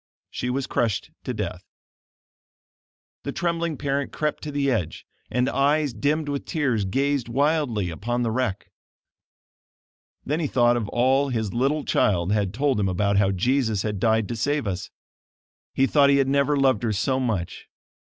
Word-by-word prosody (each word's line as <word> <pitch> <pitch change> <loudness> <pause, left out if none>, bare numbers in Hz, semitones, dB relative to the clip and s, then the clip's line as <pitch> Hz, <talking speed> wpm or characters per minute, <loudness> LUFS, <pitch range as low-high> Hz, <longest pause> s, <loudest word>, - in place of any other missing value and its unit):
She 125 - -3
was 130 +1 -1
crushed 115 -4 -1
to - - -2
death. - - -4 1.6
The - - -4
trembling 170 -3 -1
parent 140 0 -2
crept 150 -1 -2
to 150 - -5
the 140 -1 +1
edge, 90 -10 -2 0.2
and 125 +2 +1
eyes 145 0 +1
dimmed 150 +7 0
with 145 -1 -3
tears, 130 - 0
gazed 135 +4 0
wildly 135 - +1
upon 120 +8 -2
the 115 - 0
wreck. 115 -5 -2 1.5
Then 150 +4 -1
he 160 - 0
thought 120 -2 +3
of 110 -4 -2
all 135 +3 +2
his 110 -5 -2
little 140 +5 0
child 90 -2 +1
had 105 -3 +1
told 135 +1 0
him 100 -2 +1
about 100 +2 +1
how 100 -1 +3
Jesus 110 +1 +1
had 105 -3 -2
died 110 -1 +2
to 120 - -2
save 145 +5 0
us. 95 -1 -3 0.9
He 135 - +4
thought 140 0 +4
he 140 - +5
had 135 -1 +2
never 140 +1 +2
loved 130 -6 +3
her 110 -3 0
so 130 +6 0
much. 110 -9 -3
125 Hz, 165 wpm, -24 LUFS, 105-140 Hz, 1.6 s, he